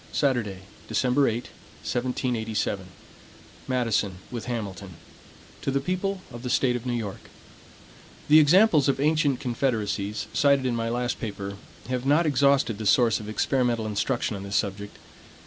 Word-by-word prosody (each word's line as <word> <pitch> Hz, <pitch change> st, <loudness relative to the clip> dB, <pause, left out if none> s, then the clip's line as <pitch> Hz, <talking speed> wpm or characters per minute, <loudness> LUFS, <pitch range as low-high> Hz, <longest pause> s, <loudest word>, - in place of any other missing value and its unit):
Saturday, 120 Hz, -9 st, 0 dB, 0.3 s
December 135 Hz, +2 st, +2 dB
8, -, -, +1 dB, 0.5 s
1787 115 Hz, -6 st, -2 dB, 0.8 s
MADISON, 115 Hz, -6 st, 0 dB, 0.2 s
with 120 Hz, -2 st, -5 dB
HAMILTON 100 Hz, -6 st, -5 dB, 0.7 s
To -, -, -2 dB
the 135 Hz, 0 st, +1 dB
People 185 Hz, +3 st, -2 dB
of 120 Hz, -1 st, -8 dB
the 125 Hz, -, -4 dB
State 125 Hz, -1 st, +2 dB
of 125 Hz, +1 st, -5 dB
New 125 Hz, -, 0 dB
York: 105 Hz, -5 st, -6 dB, 1.0 s
THE 155 Hz, +1 st, +8 dB
examples 155 Hz, -1 st, +5 dB
of 135 Hz, -, +1 dB
ancient 150 Hz, -2 st, +2 dB
confederacies, 110 Hz, -5 st, -1 dB
cited 140 Hz, -2 st, +3 dB
in 125 Hz, -2 st, 0 dB
my 115 Hz, 0 st, -1 dB
last 120 Hz, +1 st, -2 dB
paper, 100 Hz, -3 st, -5 dB, 0.3 s
have 125 Hz, -1 st, -1 dB
not 150 Hz, +4 st, +4 dB
exhausted 140 Hz, -6 st, +2 dB
the 110 Hz, -, -2 dB
source 120 Hz, -8 st, +4 dB
of 105 Hz, -, -8 dB
experimental 120 Hz, 0 st, 0 dB
instruction 110 Hz, +2 st, -1 dB
on 100 Hz, -, -6 dB
this 100 Hz, +1 st, -5 dB
subject. 100 Hz, 0 st, -2 dB
120 Hz, 145 wpm, -26 LUFS, 105-140 Hz, 1.0 s, THE